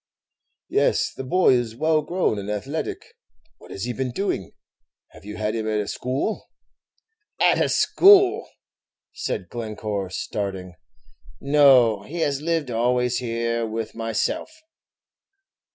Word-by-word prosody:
"Yes, - - +1
the - - -6
boy 180 +2 +3
is 120 -3 -1
well 155 +4 +2
grown 170 - -1
and 100 +1 -6
athletic. 160 - -4 0.5
What - - -16
has 95 - -6
he 125 - -2
been 130 +2 -3
doing 125 - -3 0.6
have - - -17
you 105 0 -7
had 105 0 -1
him 110 -1 -3
at 110 -1 0
a 105 - -3
school?" 135 - -3 0.9
"At - - +4
a - - 0
school!" 395 +1 +5 0.6
said - - -4
Glencore, 105 -4 -4
starting; 95 -1 -4 0.7
"no, 135 -7 +5
he 165 +11 -6
has 140 -2 0
lived 160 -4 -1
always 125 +1 +1
here 115 -1 -2
with 110 0 -5
myself. 115 - -2
120 Hz, 130 wpm, -23 LUFS, 110-150 Hz, 0.9 s, school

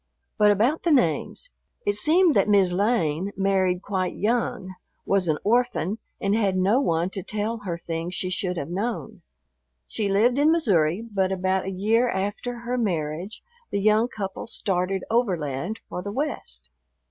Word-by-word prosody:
But 210 0 +6
about 225 +10 +2
the 345 - 0
names. 255 - +1 0.3
It 205 - +2
seemed 315 - +4
that - - +2
"Mis' 195 -3 +4
Lane" 190 -3 +1
married 190 -2 +1
quite 185 -3 -2
young, 210 -4 -1 0.3
was 195 -3 +1
an 155 -2 +2
orphan, 225 -3 +1 0.2
and 200 +1 +1
had 200 -4 +1
no 195 +7 +3
one 170 -6 0
to 195 - -4
tell 215 +4 -3
her 170 -3 -2
things 170 +1 -4
she 185 - -2
should 180 -2 -1
have 160 +1 -4
known. 215 0 -3 0.6
She 205 - -2
lived 235 +7 +3
in 300 +2 +5
Missouri, 195 - +2
but 190 -1 +1
about 190 0 0
a - - -2
year 220 +6 +2
after 215 +5 -3
her 245 +1 -2
marriage 175 -1 -3 0.3
the 200 - -1
young 215 +3 +3
couple 195 -4 -6
started 190 -3 -1
overland 180 - -1
for 180 - -5
the 200 - -5
West. 65 - -4
195 Hz, 160 wpm, -25 LUFS, 180-225 Hz, 0.6 s, But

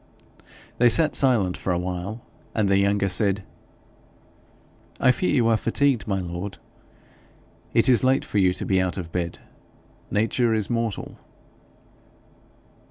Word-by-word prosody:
They 120 0 +6
sat 155 +6 +4
silent 115 -9 +3
for 95 - -3
a 90 - +1
while, 90 +5 -5 0.3
and 110 -2 +1
the 100 0 +3
younger 100 0 +1
said: 100 0 0 1.6
'I 130 - +5
fear 185 +8 -1
you 120 -4 +2
are 115 -1 +3
fatigued, 120 -1 0
my 95 -2 -1
lord. 90 +2 -6 1.2
It - - +5
is 125 -1 +4
late 130 +1 +2
for 105 - -1
you 95 -2 +4
to 90 - -4
be 95 -1 +2
out 95 0 -2
of 85 -3 -6
bed; 85 -1 -3 0.7
nature 115 +2 +1
is 110 +1 -2
mortal.' 115 -3 -3
100 Hz, 140 wpm, -23 LUFS, 95-115 Hz, 1.6 s, They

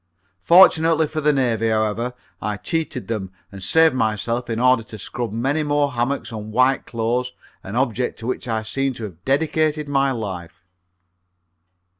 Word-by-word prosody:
Fortunately 165 - +6
for 155 +1 -4
the 150 0 +4
Navy, 120 -5 +1
however, 110 +3 -1 0.3
I 105 -1 -2
cheated 155 - -3
them 105 -5 -3 0.2
and 100 -1 -10
saved 160 - +4
myself 115 +1 -1
in 115 0 -2
order 125 -1 +4
to 110 0 -10
scrub 115 +2 -4
many 135 +8 0
more 145 -1 +1
hammocks 125 +2 -2
and 110 -1 -7
white 130 +4 +2
clothes, 120 +2 -1 0.3
an 100 - -7
object 125 -1 0
to 115 - -8
which 125 0 -3
I 110 -2 -1
seem 135 +4 -2
to 115 - -8
have 90 -5 -9
dedicated 150 +2 +1
my 140 -1 +2
life. 95 -6 -6
125 Hz, 160 wpm, -21 LUFS, 110-140 Hz, 0.3 s, Fortunately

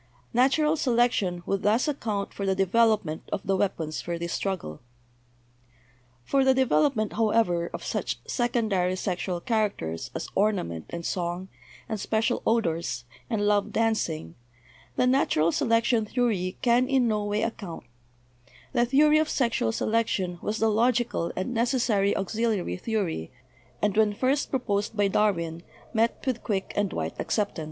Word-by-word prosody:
Natural 280 +5 +3
selec 245 -5 +3
tion 180 -6 -2
would 195 - -1
thus 220 +7 +2
account 220 -9 -2
for 200 - -5
the 190 -1 +1
development 195 -4 +2
of - - -3
the 195 - +2
weap 190 -1 0
ons 155 -1 -3
for 170 0 -3
this 170 0 -4
struggle. 185 - -3 1.4
For 270 - +2
the 265 0 +4
development, 260 -3 +2
however, 210 -6 +2
of - - -6
such - - -2
secondary 220 -7 0
sex 185 -1 -2
ual 175 -2 -3
characters 210 - -1
as - - -3
ornament 190 - 0
and 170 0 -6
song, 180 +1 -3 0.4
and 220 -2 -3
special 225 +4 0
odors, 170 - 0 0.3
and 215 -3 0
'love 205 0 +2
dancing,' 205 - -1 0.6
the - - +2
natural 250 - +3
selection 230 +1 +2
theory 210 -6 -1
can 245 +1 +3
in 265 -3 +3
no 210 -2 0
way 205 +1 -1
account; 200 -7 -5 0.9
the 240 -2 +2
theory 300 +4 +5
of 310 - +1
sexual 235 - +1
selection 190 - 0
was 210 +1 -2
the 220 0 +2
logi 240 +3 +3
cal 170 -8 -3
and 190 +7 -2
necessary 230 -4 +1
auxiliary 210 - -1
theory, 180 - -2 0.5
and 210 -2 +2
when 215 -1 +3
first 265 +5 +1
pro 265 - +1
posed 205 -2 -2
by 205 -1 +3
Darwin 170 -5 0 0.3
met 230 0 0
with 255 -3 -1
quick 195 -3 -2
and 205 -2 0
wide - - -3
acceptance. 205 -5 -1
210 Hz, 155 wpm, -27 LUFS, 185-235 Hz, 1.4 s, theory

